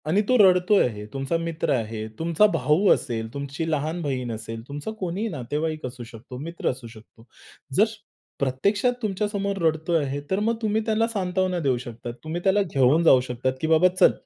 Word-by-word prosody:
आणि 185 +7 +3
तो 255 - +5
रडतो 185 -1 +5
आहे, 105 -3 -1
तुमचा 135 +4 -1
मित्र 165 -1 -2
आहे, 110 -3 -3
तुमचा 170 +5 +3
भाऊ 165 +7 +2
असेल, 110 -1 -3
तुमची 140 +3 -4
लहान 155 +3 -1
बहीण 130 -5 -2
असेल, 115 +1 -6
तुमचा 145 +9 -5
कोणीही 185 +4 -2
नातेवाईक 155 - -3
असू 125 -1 -7
शकतो, 120 +2 -10
मित्र 165 +5 -3
असू 125 -2 -5
शकतो. 115 0 -16 0.5
जर 205 - +6 0.6
प्रत्यक्षात 200 - +1
तुमच्यासमोर 200 -1 -2
रडतो 160 +1 0
आहे, 140 -1 -2
तर 190 - +2
मग 225 +2 +1
तुम्ही 220 0 +1
त्याला 225 0 +2
सांत्वना 185 -4 -1
देऊ 135 -6 +1
शकतात. 120 -1 -7
तुम्ही 160 +3 -4
त्याला 195 +1 +3
घेऊन 150 -3 +3
जाऊ 135 -6 +7
शकतात, 125 +1 -2
की 160 - 0
बाबा 160 +3 +5
चल - - +7
155 Hz, 175 wpm, -24 LUFS, 130-190 Hz, 0.6 s, जाऊ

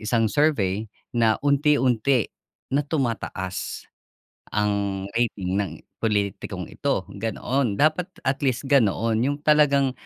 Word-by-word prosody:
isang 115 0 +1
survey 110 -9 +1 0.2
na 115 -2 +3
unti-unti 140 -4 +3 0.4
na 140 - +3
tumataas 115 - -3 0.7
ang 100 -2 0
rating 105 -6 -1
ng 100 - -2 0.3
pulitikong 105 -3 -1
ito," - - -1
ganoon. 115 +2 -1
Dapat 155 - +2 0.2
at 135 +1 0
least 130 -1 0
ganoon, 115 -4 +3
yung 140 +4 +1
talagang 140 -3 +4
115 Hz, 105 wpm, -24 LUFS, 105-140 Hz, 0.7 s, talagang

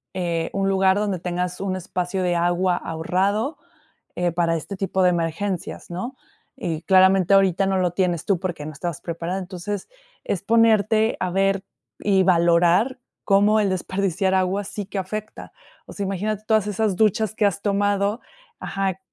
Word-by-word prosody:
eh, 170 -2 -1
un 195 0 0
lugar 190 0 +3
donde 205 -3 -1
tengas 180 +1 -3
un 190 -1 -1
espacio 185 +1 -3
de 175 -1 +1
agua 175 +1 +1
ahorrado, 195 - -1 0.6
eh, 175 -1 0
para 170 0 +1
este 180 +5 -6
tipo 190 -1 0
de 180 - +5
emergencias, 175 +2 -3
¿no?, 215 +10 -5 0.4
y 160 -2 -3
claramente 190 0 +5
ahorita 195 -1 +3
no 195 0 +1
lo 180 -2 +1
tienes 175 -2 -1
tú 195 -4 +1
porque 175 -5 -4
no 155 - -5
estabas 170 +2 -5
preparada. 170 +2 -4
Entonces 185 +2 -5 0.4
es 185 - -2
ponerte 220 0 +3
a 185 - -1
ver 195 +1 +1 0.4
y 195 -2 +3
valorar 175 +7 +3 0.3
cómo 205 +2 +4
el 200 - +1
desperdiciar 190 0 -1
agua 190 +2 +1
sí 205 +1 -5
que 205 - -6
afecta. 215 +3 -6 0.3
O - - -11
sea, 200 - -3
imagínate 205 +2 -2
todas 220 -2 +3
esas 210 -1 0
duchas 215 0 +2
que 215 - +2
has 200 -1 0
tomado 205 +1 +1 0.4
Ajá. 195 -1 -2
190 Hz, 165 wpm, -23 LUFS, 175-200 Hz, 0.6 s, de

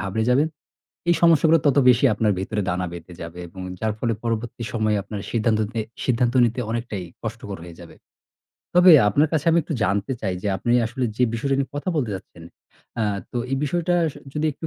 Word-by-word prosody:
ঘাবড়ে 105 +3 -1
যাবেন 140 +5 +4 0.6
এই 175 - +5
সমস্যাগুলো 165 -1 +5
তত 145 -1 +3
বেশি 125 +2 +5
আপনার 105 -1 +1
ভেতরে 105 +2 -2
দানা 90 +1 -1
বেঁধে 85 +1 -9
যাবে 85 +1 -8
এবং 95 +2 -11 0.2
যার 110 -1 0
ফলে 115 -1 0
পরবর্তী 115 +1 -3
সময়ে 110 -2 +1
আপনার 100 +1 -6
সিদ্ধান্ত 110 -1 +1
তে 115 - -2 0.2
সিদ্ধান্ত 125 0 +1
নিতে 120 +2 -1
অনেকটাই 115 -5 -3 0.2
কষ্টকর 110 -3 -6
হয়ে 85 -2 -12
যাবে। - - -12 0.8
তবে 180 0 +8 0.2
আপনার 145 +9 +3
কাছে 160 0 0
আমি 165 - +4
একটু 155 - -4
জানতে 100 +5 0
চাই 95 -3 -1
যে, 105 - -1
আপনি 120 - -3 0.2
আসলে 125 +2 -3
যে 125 - +3
বিষয়টা 135 +4 0
নিয়ে 135 -1 -1
কথা 145 - -4
বলতে 120 -8 0
চাচ্ছেন, 90 -3 -10 0.6
আ - - +2 0.3
তো 125 - -1
এই 135 - +2
বিষয়টা 175 +4 0 0.2
স - - -22 0.2
যদি 155 +1 0
একটু 160 - -7
115 Hz, 195 wpm, -23 LUFS, 105-140 Hz, 0.8 s, তবে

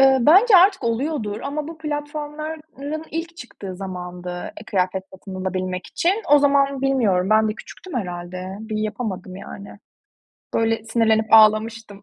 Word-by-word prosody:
Eee, 270 0 +6
bence 380 - +7
artık 375 -5 +5
oluyordur 230 -3 -2
ama 295 +2 -4
bu 330 -1 -9
platformların 300 0 -5
ilk 330 +1 -5
çıktığı 195 - -8
zamandı, 180 -2 -7 0.3
eee, 210 - -11
kıyafet 190 -1 0
satın 190 0 -10
alabilmek 185 -1 -3
için. 390 +6 0
O 290 - +8
zaman 280 -1 +3
bilmiyorum, 215 -9 +2
ben 220 0 +4
de 215 - -2
küçüktüm 365 +8 -11
herhâlde. 180 0 -6
Bir 220 -1 -5
yapamadım, 210 -4 -4
yani. 200 +1 -10 0.8
Böyle, 225 -1 +1
sinirlenip 220 -1 +2
ağlamıştım. 215 -1 +4
225 Hz, 140 wpm, -22 LUFS, 195-295 Hz, 0.8 s, O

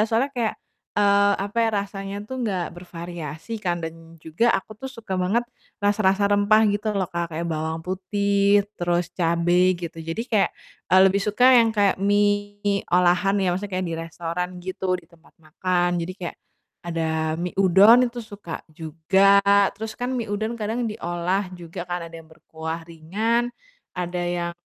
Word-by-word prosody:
soalnya 235 +6 +1
kayak 230 -3 0 0.4
eee, 200 0 +4
apa 205 +3 -9
ya, 225 - +2
rasanya 195 0 -6
tuh 260 - -5
nggak 185 -5 -1
bervariasi 170 0 -8
kan 175 -1 +1
dan 165 0 -10
juga 165 +9 0
aku 195 - -11
tuh 265 0 -6
suka 220 -5 -6
banget 220 +7 +1 0.4
rasa-rasa 200 -1 +3
rempah 205 +1 +4
gitu 205 +2 -3
loh, 190 -3 -1
Kak, 170 -1 -3
kayak 170 +2 -3
bawang 160 0 -2
putih, 200 +2 +2 0.2
terus 175 0 0
cabe 175 +1 +3
gitu, 165 -1 -6
jadi 165 +8 -2
kayak, 205 -3 +3 0.4
eee, 185 - +8
lebih 195 +1 +2
suka 210 +4 +2
yang 230 -1 +4
kayak 200 -2 +3
mie 205 0 +1
olahan 180 +2 +3
ya, 190 - +1
maksudnya 200 0 -6
kayak 185 - -2
di - - -2
restoran 165 +2 -4 0.2
gitu, 185 0 -4
di - - -23
tempat 170 -1 -23
makan, 175 +3 0
jadi 185 +2 -5
kayak 175 - -5 0.5
ada 160 -2 -1
mie 175 +1 -3
udon 205 +7 +6
itu 240 0 -7
suka 205 -6 -8
juga, 170 +6 +3 0.4
terus 220 +1 -5
kan 245 +1 -3
mie 230 -3 -3
udon 220 +3 -2
kadang 225 +2 -2
diolah 185 -1 -2
juga 175 0 -7
ka,n 175 -1 -3
ada 165 - -11
yang 165 - -11
berkuah 160 0 -6
ringan, 220 +9 -1 0.4
ada 180 0 -4
yang 175 -1 -2
185 Hz, 165 wpm, -23 LUFS, 170-205 Hz, 0.5 s, eee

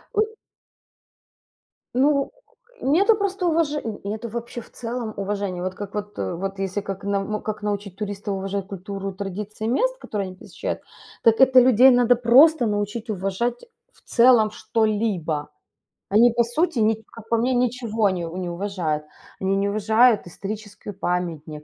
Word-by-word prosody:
У 435 +1 +1 1.6
Ну, 280 +1 +3 0.5
нету 385 - +4
просто 390 -3 -1
уваже 315 -3 +1
и 210 -4 -6
это 220 +2 -4
вообще 235 +1 -6
в - - -12
целом 230 -2 -5
уважения. 200 -2 -3
Вот 185 0 -3
как 205 0 -7
вот, 205 0 -5
э, 95 -1 -2
вот 195 +2 -4
если 195 +1 -2
как 195 0 -6
на, 200 -1 0
ну, 215 +1 -3
как 215 -1 -4
научить 205 -2 -3
туристов 205 -1 -4
уважать 195 0 -3
культуру, 195 0 -6
традиции 205 +3 -5
мест, - - +1
которые 205 - -4
они 185 - -9
посещают, - - -5 0.4
так 225 -1 +5
это 260 -1 +7
людей 255 +1 +7
надо 245 -1 +4
просто 250 +3 +6
научить 210 +2 -2
уважать 210 - -2 0.3
в - - -26
целом 235 -3 +5
что-либо. 205 -11 -1 0.6
Они, 225 +4 +5
по 235 0 +2
сути, 300 +5 -1
ни 220 +1 +4 0.2
как 225 -1 -12
по 230 - +3
мне, 250 +3 +1
ничего 235 -3 +1
не 175 -2 -3
у 170 +3 -7
не 185 - -3
уважают. 170 -5 -2 0.3
Они 190 0 0
не 200 +1 +1
уважают 220 +1 +3
историческую 205 +2 -7
памятник. 165 -5 -3
210 Hz, 160 wpm, -23 LUFS, 195-240 Hz, 1.6 s, это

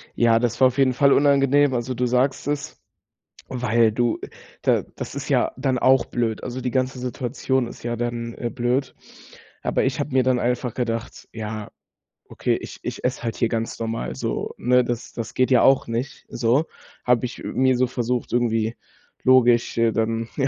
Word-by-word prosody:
Ja, 115 -1 +4
das 120 -1 -1
war 130 - +7
auf 125 - -4
jeden 135 -2 +4
Fall 140 +2 +4
unangenehm. 140 -1 +4
Also, 120 +1 -2
du 125 +1 -1
sagst 130 +3 +1
es, 145 +1 -3 0.7
weil 120 -3 +2
du 120 0 0 0.4
da - - +2
das - - -6
ist - - -5
ja - - +2
dann 130 -1 0
auch 130 -1 +4
blöd. 115 -3 -2
Also, 130 +1 -5
die 125 - -2
ganze 130 +1 -1
Situation 125 0 -1
ist - - -11
ja 120 0 -2
dann, 120 0 -3
äh, 120 - -3
blöd. 125 +2 -1 0.7
Aber - - 0
ich 130 +1 -1
habe 145 -1 -3
mir 130 -1 +4
dann 130 -1 +2
einfach 125 0 -1
gedacht: 115 -2 -4
„Ja, 110 -1 -6 0.6
okay, - - 0
ich - - -9
ich - - -5
esse 125 -1 -1
halt 115 - -2
hier 115 - +1
ganz 115 0 -3
normal 110 - -3
so, 65 - -3
ne?“ 125 +1 +3
Das 120 -1 -4
das 115 -1 -5
geht 130 0 +1
ja 125 - +6
auch 135 -2 +4
nicht 120 +4 -4
so. 125 +7 +1 0.4
Habe 125 0 +2
ich, 125 - -7
äh, - - -5
mir 130 0 +2
so 125 0 +2
versucht 125 0 -2
irgendwie 115 -2 0 0.5
logisch 125 -3 +4
äh, 115 -1 +3
dann, 115 +1 -1
ja, 135 -1 +2
125 Hz, 190 wpm, -23 LUFS, 115-130 Hz, 0.7 s, war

